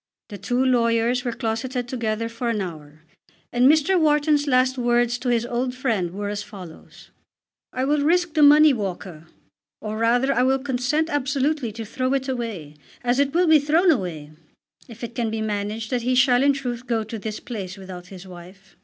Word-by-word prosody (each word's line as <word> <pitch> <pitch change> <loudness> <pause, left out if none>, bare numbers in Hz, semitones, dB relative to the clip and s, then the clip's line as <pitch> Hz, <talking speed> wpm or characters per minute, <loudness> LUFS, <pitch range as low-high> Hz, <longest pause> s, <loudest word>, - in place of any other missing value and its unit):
The 205 -2 -8
two 245 +7 0
lawyers 240 0 +2
were 245 - -2
closeted 240 +2 -3
together 230 -3 -2
for 230 +1 -4
an 225 -2 -1
hour, 155 -4 -8 0.5
and 245 +2 +5
Mr. 315 +4 +2
Wharton's 300 -1 +2
last 255 -1 +3
words 240 -1 +1
to 255 - -2
his 235 -1 +1
old 250 +1 -2
friend 225 -9 -1
were 205 +3 -5
as 205 0 -3
follows: 185 -6 -12 0.6
"I 255 +1 -2
will 295 +1 +1
risk 345 +2 +1
the 310 - +2
money, 295 0 +7
Walker, 185 -7 -6 0.5
or 215 0 -5
rather 245 +4 +2
I 245 - +1
will 265 +1 +3
consent 270 +3 -1
absolutely 280 -2 -1
to 225 +1 -6
throw 255 +4 -1
it 265 0 -2
away, 220 - -5 0.3
as 245 +2 +1
it 280 -1 +2
will 350 +4 +2
be 315 -2 +6
thrown 320 +5 +3
away, 170 - -3 0.6
if 230 0 -12
it 235 0 -5
can 235 -2 -2
be 220 0 -3
managed 215 +1 -3
that 250 -1 0
he 255 +2 0
shall 250 -1 +4
in 280 +1 +4
truth 250 -2 -5
go 230 -2 0
to 220 +1 -7
this 215 +1 -5
place 200 -7 -7
without 185 -2 -10
his 190 0 -11
wife." 185 +2 -14
240 Hz, 190 wpm, -23 LUFS, 210-270 Hz, 0.6 s, money